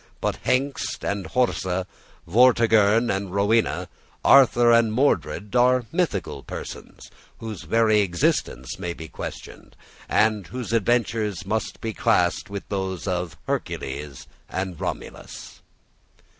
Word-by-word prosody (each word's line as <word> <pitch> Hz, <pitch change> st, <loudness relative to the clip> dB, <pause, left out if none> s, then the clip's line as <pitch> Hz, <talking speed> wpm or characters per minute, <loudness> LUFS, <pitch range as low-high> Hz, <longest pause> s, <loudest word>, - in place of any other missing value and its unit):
But -, -, -1 dB
Hengist 135 Hz, +2 st, -1 dB
and 100 Hz, -1 st, -2 dB
Horsa, 95 Hz, -7 st, 0 dB, 0.4 s
Vortigern 115 Hz, +1 st, +4 dB
and 95 Hz, -1 st, -3 dB
Rowena, 105 Hz, +3 st, +1 dB, 0.4 s
Arthur 120 Hz, -3 st, +6 dB
and 115 Hz, -1 st, +4 dB
Mordred 105 Hz, -, 0 dB
are 125 Hz, 0 st, +4 dB
mythical 100 Hz, -, -1 dB
persons, -, -, -9 dB, 0.3 s
whose 110 Hz, -5 st, -7 dB
very 110 Hz, -2 st, +3 dB
existence 85 Hz, -7 st, -1 dB
may 90 Hz, -2 st, -3 dB
be 80 Hz, -1 st, -9 dB
questioned, -, -, -9 dB, 0.3 s
and 110 Hz, -3 st, +2 dB
whose 125 Hz, -2 st, -5 dB
adventures 110 Hz, -4 st, 0 dB
must 110 Hz, +3 st, -3 dB
be 110 Hz, -1 st, -3 dB
classed 95 Hz, -8 st, +1 dB
with 100 Hz, -1 st, -6 dB
those 95 Hz, -3 st, -3 dB
of 90 Hz, -3 st, -2 dB
Hercules 70 Hz, 0 st, -4 dB, 0.2 s
and 95 Hz, -3 st, -4 dB
Romulus. -, -, -7 dB
105 Hz, 115 wpm, -24 LUFS, 95-115 Hz, 0.4 s, Arthur